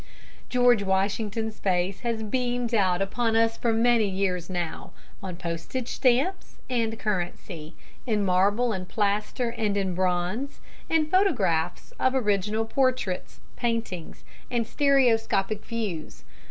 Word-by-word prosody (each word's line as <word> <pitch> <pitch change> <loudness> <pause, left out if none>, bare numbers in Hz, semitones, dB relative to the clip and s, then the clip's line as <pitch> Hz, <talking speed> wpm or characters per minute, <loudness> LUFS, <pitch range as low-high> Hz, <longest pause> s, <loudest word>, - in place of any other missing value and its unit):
] - - -25
George 245 -3 +5
Washington's 205 +3 -1
face 185 0 0
has 230 -2 -2
beamed 245 +1 -1
out 190 -3 +3
upon 225 +3 0
us 225 0 +3
for 235 - 0
many 225 -1 +3
years 185 -2 -1
now, 175 -3 -4 0.3
on 185 -2 -5
postage 175 +8 -4
stamps 270 +10 +1
and 225 -2 0
currency, 175 -5 -4 0.3
in 210 -3 +1
marble 200 +6 +3
and 185 -1 -5
plaster 210 +3 0
and 210 -3 -1
in 190 -2 0
bronze, 185 +8 -1 0.3
in 320 -1 +3
photographs 285 - +1
of 260 +1 +2
original 210 -2 +1
portraits, 255 -6 -1
paintings, 230 -8 -3 0.3
and 240 -2 0
stereoscopic 225 -7 +2
views. 205 -9 -4
215 Hz, 125 wpm, -26 LUFS, 190-240 Hz, 0.3 s, George